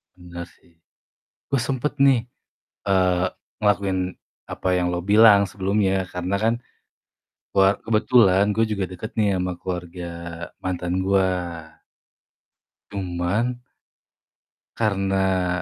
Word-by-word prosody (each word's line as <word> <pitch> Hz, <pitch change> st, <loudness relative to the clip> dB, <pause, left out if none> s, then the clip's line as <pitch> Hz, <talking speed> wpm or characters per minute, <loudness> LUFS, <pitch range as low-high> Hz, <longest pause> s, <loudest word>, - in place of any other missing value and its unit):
Bener 85 Hz, -1 st, -8 dB
sih. 85 Hz, -1 st, -26 dB, 0.7 s
Oh 140 Hz, -, +2 dB
sempet 135 Hz, +2 st, -1 dB
nih, 135 Hz, -4 st, +4 dB, 0.6 s
eee, 90 Hz, -1 st, +3 dB, 0.4 s
ngelakuin 95 Hz, -3 st, 0 dB, 0.3 s
apa 95 Hz, -, -3 dB
yang 90 Hz, -1 st, +1 dB
lo 90 Hz, -, -1 dB
bilang 105 Hz, -1 st, +7 dB
sebelumnya. 95 Hz, 0 st, 0 dB
Karena 90 Hz, +2 st, -2 dB
kan, 115 Hz, +1 st, +3 dB, 1.0 s
war 95 Hz, 0 st, +4 dB
kebetulan 105 Hz, -3 st, +4 dB
gue 115 Hz, 0 st, +3 dB
juga 100 Hz, -3 st, -2 dB
deket 95 Hz, +5 st, -7 dB
nih 100 Hz, -3 st, +2 dB
ama 90 Hz, 0 st, -1 dB
keluarga 90 Hz, -1 st, -5 dB, 0.5 s
mantan 90 Hz, 0 st, -2 dB
gua. 95 Hz, -1 st, +3 dB, 1.6 s
Cuman 100 Hz, +6 st, -2 dB, 1.2 s
karena, 95 Hz, -4 st, 0 dB
95 Hz, 100 wpm, -23 LUFS, 90-105 Hz, 1.6 s, bilang